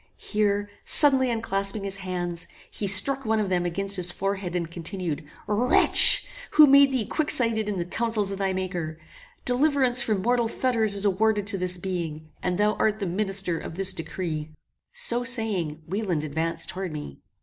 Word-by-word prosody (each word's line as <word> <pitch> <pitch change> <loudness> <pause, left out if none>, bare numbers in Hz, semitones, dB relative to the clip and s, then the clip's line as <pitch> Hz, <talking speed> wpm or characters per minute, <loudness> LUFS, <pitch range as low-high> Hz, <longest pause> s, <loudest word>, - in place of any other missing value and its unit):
Here 205 -1 -2 0.2
suddenly 265 -3 +4
unclasping 200 -3 -2
his 195 0 -4
hands, 175 -2 -5 0.2
he 205 - -5
struck 270 +8 +4
one 220 -2 -1
of 205 -3 -2
them 175 -1 -1
against 195 +3 -2
his 180 -1 +1
forehead, 195 -1 -4
and 170 -2 -4
continued 170 -2 -4 0.2
"Wretch! 225 +4 +6 0.3
who 305 - +8
made 280 0 +5
thee 255 -5 -2
quicksighted 230 -6 0
in 200 - -4
the 170 - -3
councils 215 0 0
of 195 - -6
thy 195 -1 -1
Maker? 180 -4 -5 0.5
Deliverance 260 -1 +2
from 215 -5 -2
mortal 240 0 0
fetters 225 -3 -1
is 200 +1 -1
awarded 205 +1 0
to 200 -1 -2
this 180 0 -1
being, 165 -4 -6
and 180 -1 -2
thou 210 +1 +1
art 215 -1 0
the 205 - -4
minister 190 -2 0
of - - -9
this 190 0 +2
decree." 160 -2 -6 0.4
So 480 - 0
saying, 205 - 0
Wieland 185 -3 -3
advanced 160 +2 -2
towards 185 -1 -5
me. 145 - -9
195 Hz, 170 wpm, -24 LUFS, 175-225 Hz, 0.5 s, who